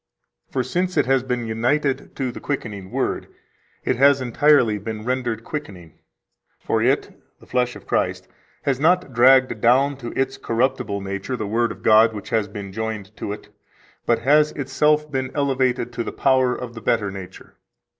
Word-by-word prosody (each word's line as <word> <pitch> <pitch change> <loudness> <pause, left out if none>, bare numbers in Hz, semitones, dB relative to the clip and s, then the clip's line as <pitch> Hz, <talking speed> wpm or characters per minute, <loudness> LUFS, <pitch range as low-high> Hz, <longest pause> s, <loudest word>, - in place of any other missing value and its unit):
For 130 - -1
since 180 +4 -2
it 145 - +4
has 135 0 +3
been 125 -2 -3
united 125 +5 -1
to 130 -3 -2
the - - -9
quickening 105 -9 -4
Word, - - -2 0.6
it 130 - +1
has 140 +1 +5
entirely 130 -3 +3
been 110 +1 -6
rendered 120 -3 -2
quickening. 95 - -8 0.6
For - - -1
it - - 0 0.2
[the - - -17
flesh 125 -1 0
of - - -12
Christ] - - -1 0.4
has 135 -2 0
not 165 -2 +2
dragged 130 -1 +5
down 135 +4 +3
to 120 -3 -8
its 135 0 0
corruptible 115 -5 -1
nature 100 +5 -4
the 110 - -3
Word 115 +3 0
of - - -11
God 110 +1 +6
which 105 +2 -8
has 110 -3 +1
been 100 -1 -8
joined 110 -1 -5
to - - -4
it, 105 - -8 0.6
but 120 - +4
has 150 +6 +3
itself 150 +2 +1
been 130 -1 -2
elevated 130 -4 0
to 115 -1 -2
the - - -5
power 130 -2 +2
of 120 -2 -7
the 115 - -9
better 105 -4 0
nature. 95 -1 -10
125 Hz, 175 wpm, -22 LUFS, 110-135 Hz, 0.6 s, God